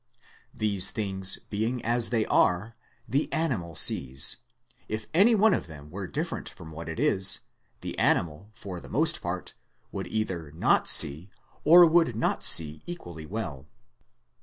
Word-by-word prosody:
These 100 Hz, -3 st, +1 dB
things 95 Hz, -3 st, -1 dB
being 115 Hz, +4 st, -3 dB
as 120 Hz, 0 st, +1 dB
they 115 Hz, -3 st, 0 dB
are, 105 Hz, +6 st, 0 dB, 0.3 s
the 135 Hz, +7 st, -2 dB
animal 110 Hz, -, -3 dB
sees: 65 Hz, -1 st, +4 dB, 0.5 s
if 110 Hz, 0 st, -5 dB
any 205 Hz, +8 st, +4 dB
one 215 Hz, 0 st, +3 dB
of -, -, -3 dB
them 75 Hz, -2 st, -12 dB
were 95 Hz, +1 st, -7 dB
different -, -, -5 dB
from 80 Hz, -1 st, -13 dB
what 80 Hz, +1 st, -9 dB
it 80 Hz, -, -7 dB
is, 95 Hz, 0 st, +3 dB, 0.4 s
the -, -, -6 dB
animal, 85 Hz, +4 st, -1 dB
for 95 Hz, -5 st, -9 dB
the -, -, -13 dB
most -, -, 0 dB
part, -, -, -5 dB, 0.4 s
would -, -, -6 dB
either 95 Hz, -8 st, -4 dB
not 80 Hz, -, +1 dB
see, 80 Hz, +8 st, +4 dB, 0.3 s
or 175 Hz, +3 st, +7 dB
would 165 Hz, -7 st, +2 dB
not 115 Hz, -, -2 dB
see 75 Hz, -2 st, +5 dB
equally 85 Hz, -, -9 dB
well. 80 Hz, -9 st, -7 dB
100 Hz, 150 wpm, -26 LUFS, 80-120 Hz, 0.5 s, or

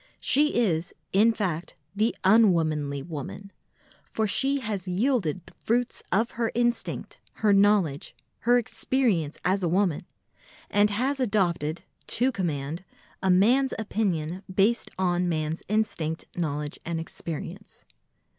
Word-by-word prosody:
She 300 Hz, +3 st, +3 dB
is, 175 Hz, -8 st, 0 dB, 0.2 s
in 215 Hz, +4 st, +5 dB
fact, 180 Hz, -6 st, -3 dB, 0.2 s
the 215 Hz, +3 st, +1 dB
_un_womanly 160 Hz, -9 st, +3 dB
woman, 170 Hz, +5 st, -7 dB, 0.6 s
for 220 Hz, -, 0 dB
she 270 Hz, +6 st, +1 dB
has 205 Hz, -6 st, -3 dB
yielded 185 Hz, -, 0 dB
the -, -, -15 dB
fruits 240 Hz, +1 st, 0 dB
of 225 Hz, +5 st, +2 dB
her 230 Hz, -1 st, -1 dB
instinct, 240 Hz, 0 st, -1 dB, 0.3 s
her 205 Hz, -, +6 dB
knowledge, 200 Hz, -8 st, +2 dB, 0.2 s
her 240 Hz, +2 st, +4 dB
experience 225 Hz, -, 0 dB
as 190 Hz, +2 st, +2 dB
a 175 Hz, -, 0 dB
woman, 185 Hz, -2 st, +1 dB, 0.7 s
and 205 Hz, +1 st, +4 dB
has 260 Hz, +7 st, 0 dB
adopted, 175 Hz, -, 0 dB, 0.2 s
to 255 Hz, +3 st, +2 dB
command, 165 Hz, -, -3 dB, 0.4 s
a 190 Hz, -, +1 dB
man's 240 Hz, +9 st, +4 dB
opinion 190 Hz, -6 st, -2 dB
based 205 Hz, +5 st, +2 dB
on 180 Hz, -1 st, +1 dB
man's 155 Hz, 0 st, -2 dB
instinct, 200 Hz, -7 st, -1 dB
knowledge 150 Hz, -3 st, -3 dB
and 170 Hz, -1 st, -3 dB
experience. 165 Hz, +4 st, -7 dB
195 Hz, 125 wpm, -26 LUFS, 165-225 Hz, 0.7 s, her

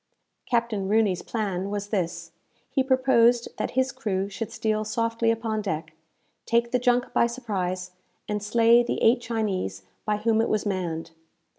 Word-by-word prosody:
Captain 230 Hz, -5 st, 0 dB
Rooney's 210 Hz, -4 st, +2 dB
plan 200 Hz, -4 st, -2 dB
was 205 Hz, 0 st, -4 dB
this: 185 Hz, -6 st, -2 dB, 0.4 s
he 270 Hz, -, +2 dB
proposed 255 Hz, -3 st, +3 dB
that -, -, -3 dB
his 260 Hz, 0 st, +2 dB
crew 200 Hz, -7 st, -2 dB
should 210 Hz, +2 st, -5 dB
steal 215 Hz, -1 st, -1 dB
softly 230 Hz, +1 st, 0 dB
upon 225 Hz, -1 st, -1 dB
deck, 160 Hz, -5 st, -4 dB, 0.5 s
take 235 Hz, 0 st, +2 dB
the 250 Hz, -, +2 dB
junk 245 Hz, 0 st, +1 dB
by 235 Hz, -, +4 dB
surprise, 185 Hz, -7 st, -3 dB, 0.4 s
and 210 Hz, 0 st, -2 dB
slay 230 Hz, +3 st, +5 dB
the 240 Hz, -, -2 dB
eight 240 Hz, +2 st, +5 dB
Chinese 200 Hz, -, -2 dB, 0.2 s
by 210 Hz, -1 st, 0 dB
whom 220 Hz, +1 st, +2 dB
it 225 Hz, -, 0 dB
was 215 Hz, 0 st, 0 dB
manned. 170 Hz, -5 st, -3 dB
220 Hz, 155 wpm, -26 LUFS, 195-235 Hz, 0.5 s, slay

